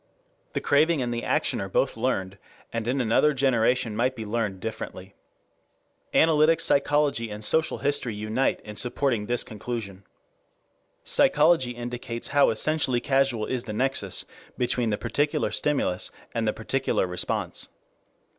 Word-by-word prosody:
The - - -2
craving 155 0 +3
and 120 -1 -2
the 120 - -3
action - - 0
are 95 - -4
both 130 - +1
learned, 100 -5 -2 0.3
and 115 -1 -3
in 130 +3 0
another 130 +5 +3
generation 125 -3 +2
might 125 +4 +1
be 110 -2 -6
learned 105 -3 -2
differently. 95 -2 -7 1.0
Analytic 160 0 +4
psychology 140 -6 +2
and 105 +1 -6
social 160 +8 +2
history 140 -5 0
unite 110 +5 -1
in 105 0 -9
supporting 120 -2 -1
this 120 0 +1
conclusion. 105 -3 -6 1.0
Psychology 150 -5 +3
indicates 120 -1 -5
how 145 0 +4
essentially 130 +1 +1
casual 135 -4 +1
is 125 -2 -3
the 110 - -5
nexus 120 -5 0 0.3
between 120 -1 0
the 105 - 0
particular 145 +7 0
stimulus 135 -11 0 0.2
and - - -1
the - - +1
particular - - -1
response. 90 0 -3
120 Hz, 135 wpm, -26 LUFS, 110-140 Hz, 1.0 s, Analytic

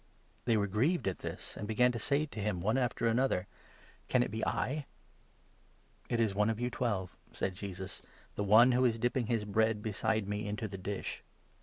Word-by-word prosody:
They 115 -2 +3
were 100 - +2
grieved 120 - +1
at 95 - -1
this, - - -6
and 105 - -5
began 125 +3 +4
to 115 - -4
say 145 +3 +1
to 115 -8 -9
him, 105 -3 -1
one 105 +7 +1
after 125 -2 0
19 115 - +4
another: 100 -8 +1 0.3
" - - -27
Can 125 -1 +4
it - - -4
be 110 +1 -3
I? 145 +3 -1 0.6
" - - -34
"It 120 - 0
is 110 -4 +2
one 105 +2 +2
of 110 0 -1
you 125 0 -1
Twelve," 100 -7 -2 0.2
said 95 - -2
Jesus, 95 0 -7 0.3
"the 105 - -2
one 110 +5 +7
who 125 +1 +3
is 120 -3 +4
20 - - -9
dipping 120 +1 +1
his 115 -3 0
bread 110 +1 +1
beside 110 0 0
me 105 +1 -2
into 105 +1 -3
the 95 -1 -7
dish. 100 +2 -4
110 Hz, 215 wpm, -33 LUFS, 100-120 Hz, 0.6 s, one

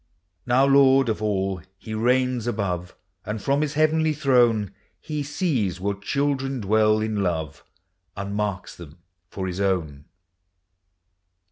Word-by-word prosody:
Now, 130 +3 +4
Lord 135 -2 +5
of 110 -1 -2
all, 95 -3 -1 0.2
he 110 +3 -8
reigns 125 +1 +1
above; 90 -6 -3 0.3
And 105 +1 -4
from 140 +7 +1
his 150 -1 -2
heavenly 155 0 +2
throne, 120 -8 +2 0.3
He 150 -2 -4
sees 140 - -1
what 100 +1 -3
children 135 +3 -1
dwell 110 +1 +2
in 110 -2 -1
love, 80 -6 -3 0.5
And 100 0 -4
marks 105 -3 -3
them 80 -2 -12 0.3
for 95 0 -5
his 95 +1 -3
own. 80 -8 -1
110 Hz, 130 wpm, -24 LUFS, 95-135 Hz, 0.5 s, Lord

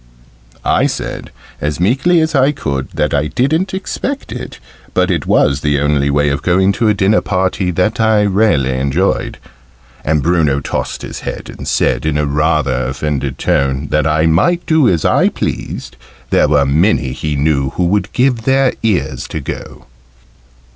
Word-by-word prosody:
I - - +3
said, - - -5 0.3
as 75 +1 -2
meekly 135 - +2
as 160 0 0
I 140 +1 +3
could, 70 - -3
that - - 0
I 70 +1 +1
didn't 160 - 0
expect 270 +8 -4
it, - - -7 0.4
but - - +2
it - - -2
was 70 +1 +2
the 75 -1 +1
only 75 -1 +1
way 75 +1 +2
of 70 - -2
going 95 +2 +2
to 115 +3 0
a 105 - +4
dinner 100 +2 +2
party 95 -1 -1
that 105 +6 0
I 110 -2 +3
really 95 -10 +2
enjoyed. 70 +8 -1 0.7
And 75 -1 0
Bruno 80 -5 +2
tossed 70 - -4
his - - -6
head, - - -6
and - - -8
said, - - 0
in 75 -1 0
a 75 - +1
rather 75 -2 0
offended 65 0 -3
tone 70 +1 0
that 75 -1 +2
I 80 +1 +2
might 100 - +2
do 155 -6 +3
as 85 -4 0
I - - +3
pleased 60 - -5 0.3
there - - +4
were 75 -2 +3
many 75 -1 +2
he 75 +2 -3
knew 70 -2 +1
that 90 - +1
would 100 +4 0
give 125 -2 +1
their 135 +2 +2
ears 95 -12 -1
to - - -5
go. - - -8
80 Hz, 170 wpm, -15 LUFS, 70-110 Hz, 0.7 s, a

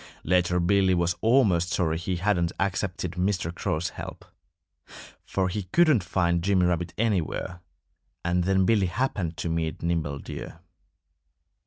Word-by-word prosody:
Later 90 +1 +2
Billy 95 +1 +3
was 85 0 +1
almost 105 -8 +3
sorry 80 -3 0
he 90 +2 -2
hadn't 90 -2 +1
accepted 95 -2 -1
Mr. 90 -2 -1
Crow's 85 -1 -2
help. - - -9 1.0
For 95 -1 -1
he 95 +1 -3
couldn't 155 - +4
find 85 -1 +1
Jimmy 95 -1 +3
Rabbit 90 -1 0
anywhere. 95 -4 -1 0.6
And 90 +1 +1
then 95 0 +3
Billy 100 -2 +3
happened 90 -5 -2
to 80 +2 -3
meet 80 -1 -2
Nimble 80 -4 -1
Deer. 80 +3 -8
90 Hz, 135 wpm, -26 LUFS, 85-95 Hz, 1.0 s, couldn't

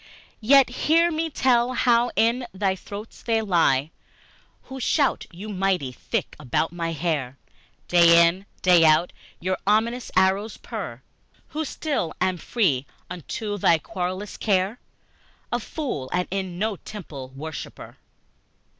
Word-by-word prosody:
Yet 270 +3 +6 0.2
hear 335 +2 +5
me 325 +1 -1
tell 255 -3 +2
how 240 0 +3
in 240 +2 +2
their 190 -1 +1
throats 205 +3 -9
they 225 -2 +1
lie 165 -8 +2 0.7
Who 265 0 -8
shout 280 +3 +1
you 190 +5 -9
mighty: 190 -9 0
thick - - -4
about 150 +3 -1
my 165 -1 -2
hair, 150 -5 -2 0.5
Day 170 -1 +6
in, 185 +4 -1 0.2
day 180 -2 +6
out, 160 +2 +4 0.3
your 185 +2 -2
ominous 230 +4 +1
arrows 190 +3 +2
purr, 175 - -7 0.5
Who 315 0 -3
still 275 - -2
am 185 0 +1
free, 155 - 0 0.2
unto 205 +4 -4
no 165 - +5
querulous 185 +5 -5
care 195 +2 0 0.7
A - - 0
fool, 245 - -4
and 180 0 0
in 190 -2 -3
no 210 +1 -1
temple 155 -12 -9
worshiper! 155 +2 -8
190 Hz, 130 wpm, -24 LUFS, 170-230 Hz, 0.7 s, Yet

